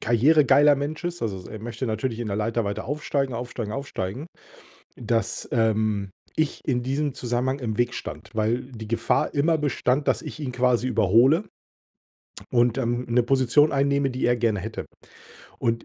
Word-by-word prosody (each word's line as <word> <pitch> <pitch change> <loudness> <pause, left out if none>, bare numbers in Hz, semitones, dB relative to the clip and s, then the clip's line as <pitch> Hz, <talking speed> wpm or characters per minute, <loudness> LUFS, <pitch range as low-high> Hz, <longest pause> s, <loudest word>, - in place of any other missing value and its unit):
karrieregeiler 145 +4 +5
Mensch 145 +4 -4
ist, 175 -3 -4
also, 95 -5 -4
er 110 - -7
möchte 120 +3 -4
natürlich 110 +1 -2
in 115 - -3
der 100 - -2
Leiter 115 +1 0
weiter 100 0 -3
aufsteigen, 140 -2 -1
aufsteigen, 120 -3 -5
aufsteigen, 135 - -4 0.7
dass, 115 -2 -2
ähm, 110 -3 +1 0.3
ich 155 -2 -1
in 125 -3 +1
diesem 140 +3 -1
Zusammenhang 125 +3 -1
im 110 -4 -3
Weg 120 0 +1
stand, - - -7
weil 115 +4 -1
die 110 -3 -8
Gefahr 115 +1 0
immer 160 +3 +2
bestand, 145 -2 0
dass - - +2
ich - - -8
ihn 135 -4 -3
quasi 125 0 +2
überhole 125 - +4 1.1
und, 120 +1 +3
ähm, 120 -1 -1
'ne 120 +1 +3
Position 135 +4 +3
einnehme, 140 0 +2
die 130 +1 -3
er 120 - +3
gerne 115 -4 0
hätte. 110 +4 -6 0.7
Und, 115 0 -1
120 Hz, 165 wpm, -25 LUFS, 115-140 Hz, 1.1 s, karrieregeiler